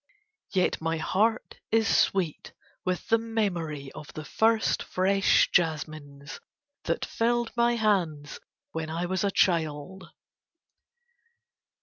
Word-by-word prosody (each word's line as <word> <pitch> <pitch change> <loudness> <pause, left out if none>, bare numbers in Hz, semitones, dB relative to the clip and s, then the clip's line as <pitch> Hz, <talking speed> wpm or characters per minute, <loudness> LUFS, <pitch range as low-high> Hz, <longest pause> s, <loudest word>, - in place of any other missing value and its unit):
Yet 185 -4 +1
my 165 0 -1
heart 220 +8 0
is 225 -1 +2
sweet 180 -6 +1 0.3
with 185 -1 -2
the 225 - +4
memory 175 -11 -2
of 150 - -10
the 155 - -7
first 225 +4 +2
fresh 195 +1 +2
jasmines 155 -3 -2 0.5
that - - -1
filled 235 0 0
my 235 0 +3
hands 175 -10 0 0.3
when 160 -1 -4
I 165 +2 -2
was 185 +2 -1
a 200 - +2
child. 170 0 0
185 Hz, 110 wpm, -27 LUFS, 155-220 Hz, 0.5 s, the